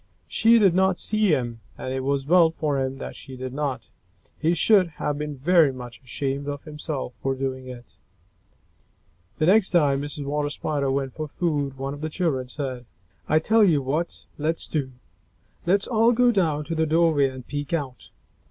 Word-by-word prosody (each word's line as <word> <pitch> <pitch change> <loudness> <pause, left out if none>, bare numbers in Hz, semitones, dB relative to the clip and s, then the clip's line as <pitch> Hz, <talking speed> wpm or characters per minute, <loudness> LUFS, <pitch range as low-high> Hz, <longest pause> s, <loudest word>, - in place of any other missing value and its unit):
She 230 +1 +4
did 195 -6 +5
not 190 0 +3
see 215 0 +1
him, 120 -8 0 0.2
and 130 - -4
it 130 - -1
was 135 +1 -1
well 170 +1 +5
for 150 -4 -1
him 130 0 -3
that - - -7
she 130 -1 -10
did 130 0 -6
not. 135 -5 -2 0.6
He 165 +3 +2
should 195 -1 +4
have 145 0 -2
been 150 -1 -4
very 160 +1 +4
much 125 -2 -9
ashamed 135 +2 -3
of 145 -1 -4
himself 150 -4 -5
for 135 0 0
doing 130 -1 -4
it. 120 -2 -11 1.4
The 155 - +1
next 200 +3 +5
time 145 -6 +3
Mrs. 145 0 -5
Water 145 +1 -1
Spider 145 -2 -2
went 135 -1 -1
for 155 -1 -5
food, 145 -4 -2
one 135 +1 -4
of 145 - -9
the 155 - -2
children 150 -7 -1
said, 130 -2 -5 0.4
"I 155 - +4
tell 220 +8 +4
you 155 -8 +3
what 155 +6 -3
let's 160 +3 -1
do! 135 -5 -3 0.7
Let's 195 +3 +3
all 230 0 +3
go 245 +1 +4
down 160 -8 +1
to 165 - -4
the 160 0 +1
doorway 160 -3 +3
and 130 -2 -10
peek 145 -1 -5
out." 140 -7 -4
145 Hz, 185 wpm, -24 LUFS, 135-170 Hz, 1.4 s, did